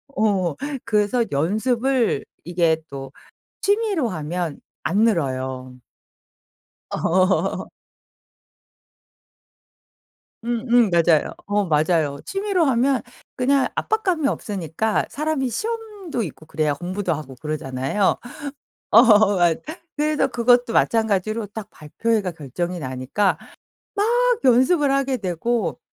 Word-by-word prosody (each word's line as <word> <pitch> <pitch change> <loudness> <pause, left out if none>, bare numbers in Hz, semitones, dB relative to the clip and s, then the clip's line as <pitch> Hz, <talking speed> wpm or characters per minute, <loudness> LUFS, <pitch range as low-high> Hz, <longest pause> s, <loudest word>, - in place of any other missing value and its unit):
어. 190 -7 +1 0.3
그래서 220 +2 +2
연습을 230 - +1 0.2
이게 170 -2 +1
또 135 -1 -7 0.5
취미로 405 - +1
하면 165 -1 -3 0.2
안 190 +6 0
늘어요. 130 - -1 1.1
어. 185 +2 +1 2.8
음음 240 -2 +2
맞아요. 170 -2 +3
어 205 0 +1
맞아요. 155 -2 +1
취미로 390 -3 0
하면 260 0 +2 0.4
그냥 270 +2 +2
압박감이 370 -9 0
없으니까 200 - -2
사람이 295 -3 -1
시험도 420 - -4
있고 155 -4 -8
그래야 155 -2 0
공부도 180 +3 -3
하고 145 -3 -7
그러잖아요. 150 +4 -1 0.7
어 215 -3 +6
맞 175 -2 +3 0.4
그래서 300 0 +1
그것도 245 0 +2
마찬가지로 215 -1 +1
딱 210 +1 -8
발표회가 200 +5 -2
결정이 170 +4 -4
나니까 140 +7 -1 0.8
막 - - +2
연습을 270 +4 +4
하게 275 -2 +1
되고 200 +2 -1
205 Hz, 225 characters per minute, -22 LUFS, 160-255 Hz, 2.8 s, 어